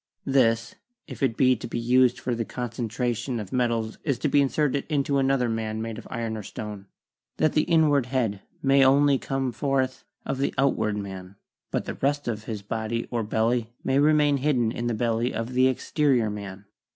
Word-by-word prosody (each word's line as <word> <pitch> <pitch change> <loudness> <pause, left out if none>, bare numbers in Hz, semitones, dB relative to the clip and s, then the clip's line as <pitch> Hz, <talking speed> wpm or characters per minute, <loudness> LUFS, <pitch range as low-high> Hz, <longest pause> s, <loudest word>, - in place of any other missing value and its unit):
This 115 -4 +2 0.3
if - - -10
it 130 -5 +1
be 130 -1 +4
to 110 - -7
be 120 - -4
used 125 +1 +3
for 125 - -2
the 115 0 -1
concentration 120 +1 -3
of 100 -3 -7
metals 115 -3 0
is 140 -5 0
to 150 - -1
be 145 - +4
inserted 140 0 +1
into 140 -2 +1
another 135 -2 +2
man 110 -1 -2
made 115 0 -4
of - - -12
iron 115 -2 -3
or 110 - -5
stone, 105 -1 -7 0.5
that 155 - +2
the 155 - +2
inward 150 -6 +3
head 115 -7 -1 0.3
only 140 +1 +5
may - - +3
come 135 -1 -2
forth 130 0 -1 0.2
of 135 - -3
the 140 - -1
outward 115 -6 +1
man, 95 -1 -7 0.3
but - - -2
the - - -4
rest 145 0 -1
of 110 -2 -3
his 105 -3 -5
body 110 +2 -3
or 120 -2 0
belly 115 +2 0
may 135 +1 +2
remain 150 -1 +4
hidden 130 -5 +1
in 120 +1 -3
the 120 - 0
belly 115 +2 0
of 115 +2 -3
the 130 +1 +4
exterior 130 -3 +1
man. 100 -1 -7
120 Hz, 190 wpm, -25 LUFS, 110-135 Hz, 0.5 s, only